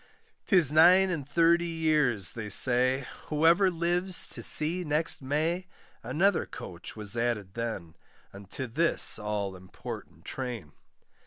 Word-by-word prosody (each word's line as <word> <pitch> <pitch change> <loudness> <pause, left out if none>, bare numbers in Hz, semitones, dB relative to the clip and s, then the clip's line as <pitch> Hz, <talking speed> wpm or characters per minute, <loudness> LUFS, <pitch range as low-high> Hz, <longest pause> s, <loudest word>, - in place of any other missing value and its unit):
'Tis 175 -8 +4
nine 180 +5 +5
and 145 -5 -5
thirty 170 +2 +2
years, 155 - 0
they 110 -2 -7
say, 130 +4 +3 0.2
Whoever 165 +5 +3
lives 175 +1 0
to - - -7
see 170 +4 +3
next 155 0 -1
May, 160 +7 -2 0.3
Another 160 - 0
coach 85 -1 -9
was 105 0 -2
added 115 -5 -3
then, 110 -8 -6 0.4
Unto 100 +6 -8
this 150 +1 +2
all 105 -2 -4
important 90 -3 -11
train. 120 - -7
140 Hz, 120 wpm, -27 LUFS, 110-170 Hz, 0.4 s, nine